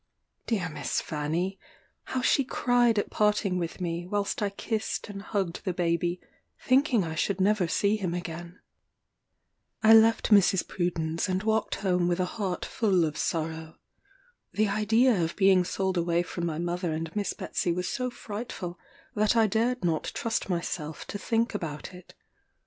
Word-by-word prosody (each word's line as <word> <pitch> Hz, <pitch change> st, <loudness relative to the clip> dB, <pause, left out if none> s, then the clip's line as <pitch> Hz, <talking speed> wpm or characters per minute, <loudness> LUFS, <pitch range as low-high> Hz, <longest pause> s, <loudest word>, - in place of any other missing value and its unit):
Dear 200 Hz, -6 st, 0 dB
Miss 160 Hz, -, -2 dB
Fanny! 160 Hz, +6 st, -2 dB, 0.5 s
how 255 Hz, -1 st, -2 dB
she 275 Hz, -, +4 dB
cried 245 Hz, -2 st, +2 dB
at 205 Hz, -, -1 dB
parting 210 Hz, -3 st, +1 dB
with 170 Hz, +1 st, -4 dB
me, 175 Hz, -1 st, -3 dB
whilst 205 Hz, +2 st, -1 dB
I 205 Hz, -, +1 dB
kissed 215 Hz, +2 st, -3 dB
and 200 Hz, -1 st, -6 dB
hugged 195 Hz, -5 st, -3 dB
the 185 Hz, -, -1 dB
baby, 175 Hz, 0 st, 0 dB, 0.4 s
thinking 255 Hz, -4 st, +3 dB
I 160 Hz, -1 st, -4 dB
should 185 Hz, +4 st, -1 dB
never 195 Hz, -1 st, +3 dB
see 200 Hz, +5 st, +1 dB
him 180 Hz, -4 st, -2 dB
again. 175 Hz, +1 st, -6 dB, 1.2 s
I 220 Hz, +1 st, +8 dB
left 225 Hz, +1 st, +5 dB
Mrs. 195 Hz, -3 st, +5 dB
Pruden's, 170 Hz, -1 st, -2 dB
and 185 Hz, +1 st, 0 dB
walked 220 Hz, 0 st, +1 dB
home 180 Hz, -2 st, +2 dB
with 175 Hz, +1 st, 0 dB
a 185 Hz, -, +2 dB
heart 185 Hz, -2 st, -3 dB
full 190 Hz, -7 st, +2 dB
of 155 Hz, -1 st, -3 dB
sorrow. 160 Hz, 0 st, -3 dB, 0.7 s
The 215 Hz, 0 st, +1 dB
idea 215 Hz, +1 st, +3 dB
of 165 Hz, -, -2 dB
being 190 Hz, -2 st, +5 dB
sold 190 Hz, +1 st, -1 dB
away 170 Hz, 0 st, +1 dB
from 170 Hz, 0 st, -4 dB
my 155 Hz, -2 st, -3 dB
mother 175 Hz, 0 st, -2 dB
and 160 Hz, +2 st, -4 dB
Miss 205 Hz, -1 st, -1 dB
Betsey 175 Hz, -, -2 dB
was 180 Hz, +1 st, -2 dB
so 250 Hz, +2 st, -2 dB
frightful, 205 Hz, -6 st, -6 dB, 0.3 s
that 215 Hz, -1 st, +2 dB
I 225 Hz, -1 st, +5 dB
dared 230 Hz, +1 st, 0 dB
not 160 Hz, -2 st, 0 dB
trust 230 Hz, -3 st, -2 dB
myself 170 Hz, -3 st, -3 dB
to 205 Hz, -, -4 dB
think 230 Hz, +1 st, 0 dB
about 165 Hz, -3 st, -5 dB
it. 180 Hz, -1 st, -14 dB
185 Hz, 165 wpm, -28 LUFS, 170-215 Hz, 1.2 s, I